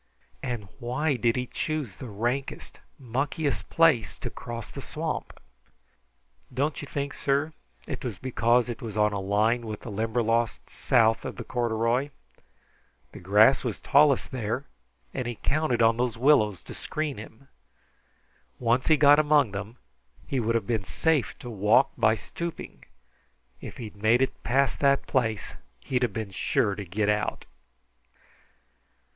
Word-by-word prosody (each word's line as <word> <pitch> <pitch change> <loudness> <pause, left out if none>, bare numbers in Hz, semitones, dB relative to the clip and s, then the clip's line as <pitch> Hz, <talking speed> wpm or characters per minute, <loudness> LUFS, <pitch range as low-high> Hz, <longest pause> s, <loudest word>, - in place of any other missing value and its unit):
And 120 -6 -4
why 135 +5 0
did 120 -1 +1
he 125 0 -1
choose 150 - -3
the 125 - -8
rankest, 120 +6 -3 0.2
muckiest 135 -1 -2
place 165 -9 +3
to - - -6
cross 115 -2 -7
the - - -7
swamp?" - - -5 1.1
"Don't 140 +4 -1
you 145 - -7
think, 140 0 -3
sir, 145 +3 0 0.3
it 135 - -6
was 120 -7 -4
because 120 0 +2
it 120 +2 -6
was 110 -3 -6
on 105 0 +3
a 100 - -2
line 110 +4 +1
with 105 -1 -6
the 115 - -7
Limberlost 115 +2 0
south 115 -2 +2
of - - -5
the - - -6
corduroy? 120 +3 0 1.0
The - - -10
grass 105 +8 +5
was 120 -5 -3
tallest 140 -1 +3
there, 125 +2 -3 0.5
and 130 -3 -3
he 120 - -3
counted 135 -2 +1
on 115 0 +4
those 120 -2 -1
willows 110 -8 +3
to - - -9
screen 155 -6 -4
him. 110 +5 -12 1.1
Once 120 +1 +1
he 155 - +5
got 145 0 +7
among 145 -6 +4
them, 105 +4 -6 0.5
he 135 - -1
would 115 0 0
have 115 - 0
been 115 -4 -1
safe 155 - 0
to 120 - -9
walk 105 +5 +3
by 110 - +3
stooping. 170 +8 -7 0.8
If - - -8
he'd 110 -4 -8
made 115 +4 +4
it 130 - -3
past 135 +2 +1
that 140 -1 +3
place, 110 -5 -1 0.3
he'd 125 - -1
been 110 -3 -5
sure 100 +2 +1
to 100 0 -6
get 100 +4 -1
out." 105 0 -1
120 Hz, 150 wpm, -27 LUFS, 110-135 Hz, 1.1 s, got